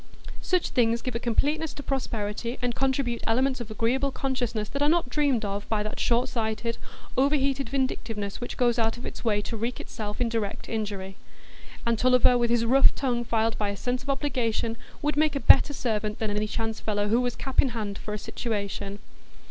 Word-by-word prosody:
Such 365 -2 +1
things 235 -1 +2
give 255 - -3
a 230 - -1
completeness 290 +6 0
to 285 - -7
prosperity, 235 -3 -2
and 245 -1 -1
contribute 265 -2 0
elements 255 +2 +2
of 235 - -6
agreeable 240 +6 +1
consciousness 245 -6 -2
that 280 - -3
are 290 - +4
not 330 -5 +2
dreamed 270 -5 +1
of 200 0 -4
by 215 -2 +1
that 215 - -5
short 240 +2 +2
sighted, 230 -1 -2 0.4
overheated 275 0 +2
vindictiveness 225 -7 -2
which 245 - -5
goes 240 -1 +2
out 225 +1 +1
its 240 - -7
way 210 -3 +1
to 230 - -4
wreak 230 +3 -3
itself 210 -1 -6
in 245 - +2
direct 225 -3 -3
injury. 200 -3 -4 0.7
And 230 -1 +1
Tulliver, 250 0 +5
with 240 -1 +2
his 235 -1 +2
rough 265 +4 +5
tongue 245 -3 0
filed 225 -1 0
by 210 -1 0
a 200 - -4
sense 250 +3 -2
of 280 - -9
obligation, 245 -5 0 0.3
would 295 0 0
make 305 -1 +3
a - - +1
better 275 +1 +7
servant 215 -6 -2
than 220 -2 -1
any 210 +1 0
chance 225 0 -3
fellow 205 -1 -1
who 230 +3 +3
was 245 -1 -1
cap 270 -1 +2
in 270 - 0
hand 215 -4 -4
for 210 - -4
a - - -3
situation. 200 -2 -4
235 Hz, 195 wpm, -27 LUFS, 215-265 Hz, 0.7 s, better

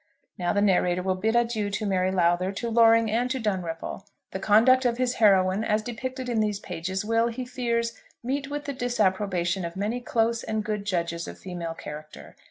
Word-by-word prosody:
Now 175 -1 -1
the 205 0 +2
narrator 180 -2 +2
will 190 0 +1
bid 220 +5 0
adieu 230 -3 +1
to 200 +2 -3
Mary 185 -2 +1
Lowther, 180 0 +2
to 235 +4 -3
Loring, 230 -1 +5
and 240 +3 +1
to 260 0 -1
Dunripple. 185 -4 -3 0.2
The 190 - -4
conduct 225 +6 +5
of 240 -2 +1
his 255 0 0
heroine, 195 -1 +4
as 215 0 +1
depicted 255 +2 -5
in 235 -2 0
these 210 -2 0
pages, 190 +2 -4
will, 230 +1 +2
he 250 +2 -4
fears, 235 -2 -1 0.3
meet 275 +3 -2
with 290 0 -4
the 280 - -3
disapprobation 195 -7 0
of 170 0 -5
many 210 +5 -2
close 230 -4 0
and 220 -1 -2
good 210 -1 -3
judges 170 -3 -2
of - - -8
female 175 -3 -6
character. 150 -1 -10
210 Hz, 190 wpm, -26 LUFS, 185-235 Hz, 0.3 s, Loring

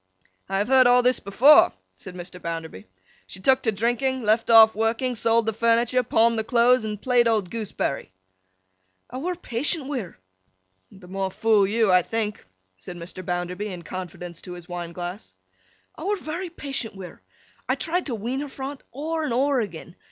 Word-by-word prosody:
'I 195 - 0
have 205 +2 0
heard 260 -1 +6
all 245 0 +5
this 250 +1 +3
before,' 250 +10 +6 0.2
said 180 - -9
Mr. 180 0 -9
Bounderby. 165 - -6 0.4
'She 190 - -7
took 260 +7 +3
to 225 - +1
drinking, 240 +4 -1
left 220 +2 +2
off 220 -1 +8
working, 225 +4 0
sold 230 0 +2
the 225 - 0
furniture, 230 +2 +2
pawned 230 -1 +2
the - - -1
clothes, 240 +1 +3
and 210 -1 -4
played 245 0 +2
old 215 -6 0
Gooseberry.' 210 - -3 1.0
'I 255 - -6
were 355 +5 -2
patient 290 0 -2
wi' 275 -1 -3
her.' 185 -7 -9 0.7
('The 190 -2 -15
more 190 +1 -3
fool 210 0 +2
you, 220 -1 +2
I 180 0 +6
think,' 215 +2 -3 0.3
said 175 - -9
Mr. 180 +2 -8
Bounderby, 180 +3 -3
in 180 -4 -7
confidence 175 -1 -7
to 180 - -8
his 175 -1 -11
wine 175 -2 -6
glass.) 175 - -7 0.6
'I - - -7
were 410 +1 0
very 350 +2 -5
patient 275 -9 -5
wi' 190 -1 -8
her. - - -13 0.5
I - - +3
tried 350 +1 -2
to 245 - -2
wean 235 +5 -3
her 290 0 -5
fra 270 +1 -6
't - - -30
ower 320 +3 -3
and 260 - -2
ower 270 0 +2
agen. 175 -4 -7
225 Hz, 190 wpm, -24 LUFS, 185-255 Hz, 1.0 s, off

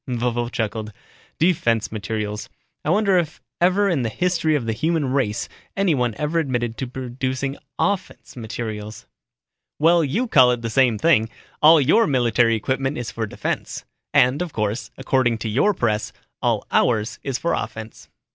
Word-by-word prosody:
Vovo 120 -1 -1
chuckled, 110 -1 -3 0.5
"Defense 120 - +1
materials. 105 -1 -4 0.3
I - - -2
wonder 195 0 +3
if 160 -3 -4 0.2
ever 190 +3 +3
in 170 -8 +1
the 115 - -1
history 170 +1 +1
of 135 -6 -1
the 115 - -1
human 155 0 0
race 120 -6 0 0.3
anyone 140 - +1
ever 150 +3 0
admitted 120 -6 -1
to 130 - -3
producing 130 +2 -3 0.2
offense 200 -3 -2
materials." 110 -2 -6 0.7
"Well, 165 +2 +4
you 195 - -1
call 130 - +6
it 120 -1 -5
the 115 - -3
same 125 -2 +3
thing. 115 -4 +3 0.3
All 155 +1 +8
your 160 - +4
military 120 -4 +3
equipment 135 +5 -1
is 120 -1 -4
for 110 -1 -3
defense. - - -4 0.3
And, 140 +1 +3
of 175 -3 -4
course, 105 +2 -2
according 130 -3 +1
to 110 - -4
your 135 - +3
press, 110 - -1 0.3
all - - 0
ours 115 0 +1
is 135 -3 -2
for 170 - -1
offense." 110 +1 -6
125 Hz, 155 wpm, -22 LUFS, 115-155 Hz, 0.7 s, All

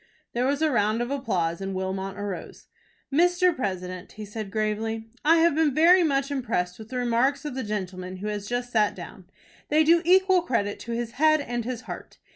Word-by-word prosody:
There 245 +2 +1
was 285 +3 0
a 310 - +3
round 220 0 +1
of 240 - -5
applause, 190 -11 -1
and 195 0 -4
Wilmot 190 +1 -3
arose. 205 -2 -6 0.5
"Mr. 355 +2 +3
President," 185 - -4
he 215 0 -8
said, 210 0 -6
gravely, 220 +1 -2 0.2
"I 325 +3 +5
have 335 -1 +4
been 300 -3 +2
very 345 +4 +6
much 275 -3 +1
impressed 225 -10 -2
with 220 0 -10
the 255 - -4
remarks 250 +4 +1
of 295 - -4
the 260 - -3
gentleman 185 -3 -4
who 195 - -7
has 205 -1 -4
just 245 +1 -3
sat 215 -3 +2
down. 180 +1 -10 0.4
They 310 +1 +4
do 335 +2 +5
equal 375 +1 +4
credit 230 - -1
to 235 - -5
his 235 0 -3
head 310 0 +5
and 240 -5 -3
his 250 -1 -4
heart. - - -9
235 Hz, 200 wpm, -26 LUFS, 205-290 Hz, 0.5 s, very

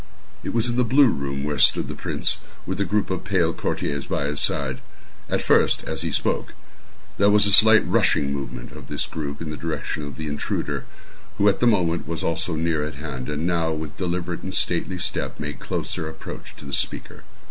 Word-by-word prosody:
It - - -3
was 115 0 +3
in 120 0 -1
the 125 - +4
blue 130 +3 +5
room 70 -5 -2
where 75 -1 -2
stood - - +5
the - - -4
prince, - - -1 0.3
with 95 +2 -2
a - - +2
group 105 -1 0
of 95 - -2
pale 90 -3 +2
courtiers 70 -3 -2
by 70 - -1
his 75 0 0
side. - - +1 0.5
At - - 0
first, - - +4
as - - -3
he - - -1
spoke, - - -1 0.6
there 100 +1 +5
was 105 0 +6
a 100 - +2
slight 110 +2 +7
rushing 70 -1 +2
movement 65 -3 -6
of - - -11
this - - -1
group 70 -1 -5
in 75 - -4
the 75 - -5
direction 80 -2 -3
of 70 -2 -6
the 80 - -5
intruder, 75 -1 -2 0.5
who 100 - +3
at 100 - +4
the 120 - +3
moment 85 -7 +2
was 85 -1 -3
also 80 +1 0
near 80 -1 0
at 75 -2 -4
hand, 70 -3 -5
and 75 +2 -2
now, 85 -2 +1
with 80 -1 -6
deliberate 90 -1 -2
and 95 -1 -4
stately 90 +2 0
step, 85 - -3
made 75 -3 -4
closer 80 - -3
approach 80 - -9
to - - -12
the 70 - -7
speaker. - - -2
80 Hz, 210 wpm, -24 LUFS, 75-95 Hz, 0.6 s, slight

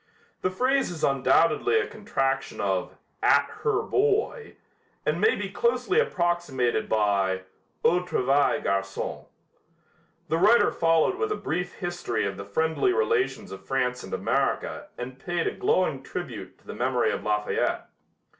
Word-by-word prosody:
The 185 - +1
phrase 255 +8 +1
is 170 -3 -7
undoubtedly 165 - +3
a 425 - 0
contraction 135 - -2
of 95 -2 -1 0.2
'at - - +5 0.2
her 440 -1 +1
boy' 445 +2 0 0.5
and - - 0
may 440 - +4
be - - -3
closely 465 -3 +1
approximated 175 - 0
by 100 -3 +1 0.4
'au 175 - +5
travail, 145 -4 +1
garçon.'" 95 0 -2 1.0
The 160 +1 0
writer 215 +6 +5
followed 165 -1 +2
with 435 -1 -1
a - - +1
brief 180 - -3
history 175 - -2
of 100 -1 -3
the 100 +1 -7
friendly 160 - +1
relations 450 -2 0
of 95 0 -9
France 125 0 -1
and - - -10
America - - -1
and 125 +2 -7
paid 175 +2 -2
a - - +1
glowing 155 -7 +1
tribute 115 - -7
to - - -29
the - - -7
memory 125 0 +1
of - - -3
Lafayette. 105 0 -1
160 Hz, 145 wpm, -26 LUFS, -, 1.0 s, at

